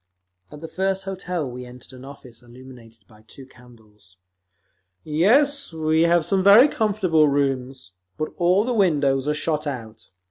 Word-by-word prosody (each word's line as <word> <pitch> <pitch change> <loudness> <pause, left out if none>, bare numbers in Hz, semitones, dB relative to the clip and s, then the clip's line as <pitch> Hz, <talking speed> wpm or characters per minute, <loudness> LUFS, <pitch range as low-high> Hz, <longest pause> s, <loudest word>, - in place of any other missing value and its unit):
At 150 0 -12
the 165 - -7
first 190 +2 -3
hotel 180 -5 -5
we 125 0 -8
entered 125 +1 -15
an 130 0 -13
office 130 -4 -13
illuminated 120 -2 -16
by 110 -1 -21
two 135 +4 -14
candles. 110 -7 -20 0.9
"Yes, 270 - +1
we 160 0 0
have 170 -1 +2
some 195 -2 0
very 210 +8 +7
comfortable 195 - +1
rooms, 135 -6 -3 0.3
but 155 0 -5
all 180 +3 +2
the 250 +2 -2
windows 145 - +1
are 150 - 0
shot 150 0 -3
out. 115 -5 -8
150 Hz, 150 wpm, -22 LUFS, 125-185 Hz, 0.9 s, very